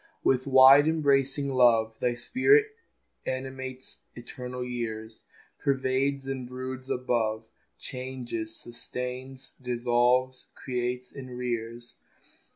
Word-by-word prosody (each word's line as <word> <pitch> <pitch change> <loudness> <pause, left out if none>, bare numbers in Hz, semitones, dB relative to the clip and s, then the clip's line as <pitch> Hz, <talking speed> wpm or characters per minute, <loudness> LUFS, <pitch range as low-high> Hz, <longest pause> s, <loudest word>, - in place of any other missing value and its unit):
With 130 +1 +2
wide 135 +2 +8
embracing 140 -3 +1
love 115 -3 +4
Thy 120 -1 0
spirit 405 - +4 0.6
animates 130 0 -5 0.2
eternal 125 +1 -7
years, 110 -2 -5 0.3
Pervades 135 0 0
and 135 -2 -4
broods 130 +1 -6
above, 115 -3 -1 0.3
Changes, 125 -4 -5
sustains, 125 +2 -7
dissolves, 125 +1 +1
creates, 125 0 -3
and 130 -3 -9
rears. 120 -1 -4
125 Hz, 90 wpm, -28 LUFS, 120-130 Hz, 0.6 s, wide